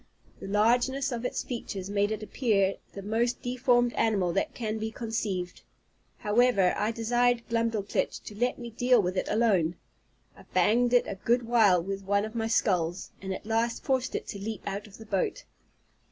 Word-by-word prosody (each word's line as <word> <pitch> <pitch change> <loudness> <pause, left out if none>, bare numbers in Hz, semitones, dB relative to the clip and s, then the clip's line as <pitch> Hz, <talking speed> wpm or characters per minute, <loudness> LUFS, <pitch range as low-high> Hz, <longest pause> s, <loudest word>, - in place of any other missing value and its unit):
The - - -7
largeness 245 +7 +2
of 240 0 -4
its - - -2
features 200 -6 -5
made 205 0 +1
it 215 0 -3
appear 205 -4 +1 0.2
the 200 - -7
most 230 +4 0
deformed 245 -1 +2
animal 195 -6 +1
that 305 - -1
can 220 -2 -3
be 220 +1 -2
conceived. 215 -6 -3 0.6
However, 210 -4 +3
I 210 - 0
desired 240 +1 +1
Glumdalclitch 230 -3 -1
to - - -8
let 245 +4 0
me 235 -1 -7
deal 245 +2 +3
with 185 -2 0
it - - -1
alone. 200 -7 +2 0.6
I - - -15
banged 240 +3 +3
it 245 - +5
a - - -3
good 240 +1 +2
while 215 -7 +4
with 195 +1 -4
one 200 +1 +1
of 220 - -8
my 225 -1 -1
sculls, 180 -6 0
and 190 0 -5
at 190 - -5
last 225 +1 0
forced 260 -1 0
it - - -3
to 200 - -5
leap 215 +2 -5
out 200 +1 -4
of 200 - -14
the 225 - -11
boat. 195 -3 -1
220 Hz, 180 wpm, -28 LUFS, 200-240 Hz, 0.6 s, it